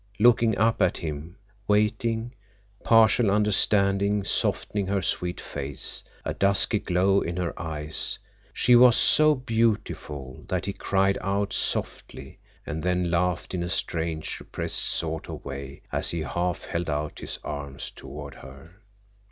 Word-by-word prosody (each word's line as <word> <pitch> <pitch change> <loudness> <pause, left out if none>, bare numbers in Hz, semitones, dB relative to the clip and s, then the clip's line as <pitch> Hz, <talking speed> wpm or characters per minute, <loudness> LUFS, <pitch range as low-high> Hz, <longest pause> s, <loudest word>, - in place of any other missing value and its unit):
Looking 115 0 +4
up 115 +2 +2
at 95 - +2
him, 80 +2 -6 0.3
waiting, 110 +3 +1 0.5
partial 115 0 +5
understanding 100 0 +3
softening 100 0 -1
her 100 0 0
sweet 90 0 -2
face, 70 -2 -3 0.2
a - - -1
dusky 100 +2 +2
glow 95 +2 +2
in 85 +1 -3
her 90 -2 -2
eyes, 75 -1 -3 0.3
she 125 - +4
was 120 -1 +8
so 155 0 +5
beautiful 110 - -2
that 90 0 -1
he 100 - -2
cried 95 0 +1
out 100 0 -1
softly - - -3 0.3
and 80 +2 -4
then 90 0 0
laughed 90 0 0
in 90 - -1
a 85 - -3
strange 80 -3 -2
repressed - - -2
sort 80 -1 -2
of - - -8
way 70 0 -7
as - - -1
he 85 - -2
half 85 +3 -2
held 85 -1 -3
out 75 0 -3
his - - -4
arms 70 -2 -6
toward 70 0 -9
her. 70 +7 -14
90 Hz, 140 wpm, -26 LUFS, 80-105 Hz, 0.5 s, was